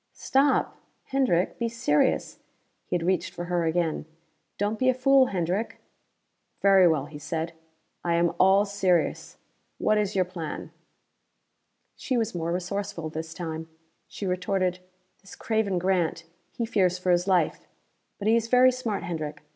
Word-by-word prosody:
"Stop! 270 Hz, +1 st, +1 dB, 0.3 s
Hendrick, 255 Hz, -10 st, 0 dB
be 235 Hz, -1 st, 0 dB
serious!" 185 Hz, -10 st, +1 dB, 0.5 s
He -, -, -1 dB
had 170 Hz, -, -1 dB
reached 185 Hz, -1 st, 0 dB
for 175 Hz, -, -4 dB
her 175 Hz, -1 st, 0 dB
again. 165 Hz, -1 st, -1 dB, 0.5 s
"Don't 205 Hz, +2 st, -1 dB
be 255 Hz, -, +3 dB
a 255 Hz, -, +2 dB
fool, 265 Hz, 0 st, +5 dB
Hendrick." 185 Hz, +3 st, -2 dB, 0.8 s
"Very 195 Hz, -2 st, +6 dB
well," 155 Hz, -4 st, +1 dB
he 150 Hz, 0 st, -10 dB
said. 165 Hz, +2 st, -3 dB, 0.5 s
"I 170 Hz, -1 st, +1 dB
am 170 Hz, 0 st, +2 dB
all 195 Hz, +2 st, +5 dB
serious. 195 Hz, -4 st, 0 dB, 0.4 s
What 215 Hz, 0 st, +2 dB
is 205 Hz, -1 st, -1 dB
your 185 Hz, -1 st, +3 dB
plan?" 175 Hz, -4 st, -6 dB, 1.2 s
She 255 Hz, -, -2 dB
was 225 Hz, -1 st, -1 dB
more 170 Hz, -1 st, -2 dB
resourceful 180 Hz, -2 st, -3 dB
this 160 Hz, +1 st, -6 dB
time. 160 Hz, -2 st, -5 dB, 0.4 s
She 200 Hz, -, -7 dB
retorted, 185 Hz, 0 st, 0 dB, 0.4 s
"This 195 Hz, -, -13 dB
craven 220 Hz, -4 st, 0 dB
Grant, 175 Hz, -2 st, 0 dB, 0.3 s
he 235 Hz, -, -3 dB
fears 185 Hz, -5 st, +1 dB
for 180 Hz, 0 st, 0 dB
his 175 Hz, +1 st, +2 dB
life 185 Hz, -2 st, +1 dB, 0.5 s
but 205 Hz, -, -3 dB
he 225 Hz, -, +5 dB
is 230 Hz, -1 st, +1 dB
very 250 Hz, +2 st, +6 dB
smart, 235 Hz, -6 st, -3 dB
Hendrick. 155 Hz, -3 st, -5 dB
185 Hz, 150 wpm, -26 LUFS, 170-215 Hz, 1.2 s, Very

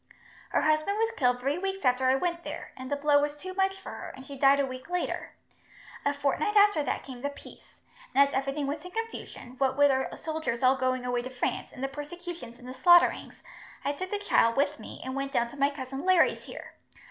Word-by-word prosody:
"Her -, -, +2 dB
husband 310 Hz, +6 st, +2 dB
was 450 Hz, +1 st, +1 dB
killed 250 Hz, -1 st, +2 dB
three 280 Hz, +6 st, -1 dB
weeks 385 Hz, -3 st, -3 dB
after 255 Hz, +1 st, +3 dB
I 260 Hz, -, +5 dB
went 340 Hz, +4 st, -1 dB
there, -, -, -7 dB
and 260 Hz, +1 st, -8 dB
the -, -, +2 dB
blow 285 Hz, 0 st, +3 dB
was 295 Hz, 0 st, -2 dB
too 370 Hz, +5 st, -7 dB
much 385 Hz, 0 st, 0 dB
for -, -, -8 dB
her, -, -, -7 dB
and 265 Hz, -, -11 dB
she 280 Hz, -, -8 dB
died 275 Hz, +1 st, +5 dB
a 280 Hz, -, +3 dB
week 255 Hz, +3 st, -8 dB
later. 360 Hz, 0 st, -2 dB, 0.7 s
A 285 Hz, -, +2 dB
fortnight 285 Hz, +8 st, 0 dB
after 410 Hz, -5 st, +6 dB
that -, -, -2 dB
came 255 Hz, -3 st, -9 dB
the 285 Hz, -, -1 dB
peace, 285 Hz, -, -14 dB, 0.4 s
and 280 Hz, +1 st, +7 dB
as 280 Hz, -, -9 dB
everything 275 Hz, +2 st, -1 dB
was 295 Hz, +2 st, -3 dB
in 360 Hz, -, -8 dB
confusion, 450 Hz, -, -6 dB
what 265 Hz, -1 st, +1 dB
wid 285 Hz, -1 st, +6 dB
our 265 Hz, 0 st, -1 dB
soldiers 315 Hz, -7 st, -3 dB
all 255 Hz, +1 st, +6 dB
going 255 Hz, -1 st, -1 dB
away 245 Hz, -1 st, 0 dB
to 255 Hz, -, -6 dB
France, 255 Hz, -1 st, -3 dB
and 255 Hz, -, -8 dB
the -, -, +1 dB
persecutions 295 Hz, -2 st, -8 dB
and 250 Hz, +1 st, -9 dB
slaughterings, 345 Hz, +6 st, +4 dB, 0.4 s
I 285 Hz, -, +2 dB
took 370 Hz, +6 st, -5 dB
the 415 Hz, -, -1 dB
child 230 Hz, -, +3 dB
with 285 Hz, +1 st, +1 dB
me -, -, -9 dB
and 260 Hz, 0 st, -4 dB
went 275 Hz, 0 st, -3 dB
down 235 Hz, 0 st, +1 dB
to -, -, -12 dB
my 280 Hz, 0 st, +3 dB
cousin 270 Hz, -1 st, -6 dB
Larry's 370 Hz, -1 st, +3 dB
here. -, -, -9 dB
280 Hz, 230 wpm, -28 LUFS, 260-345 Hz, 0.7 s, and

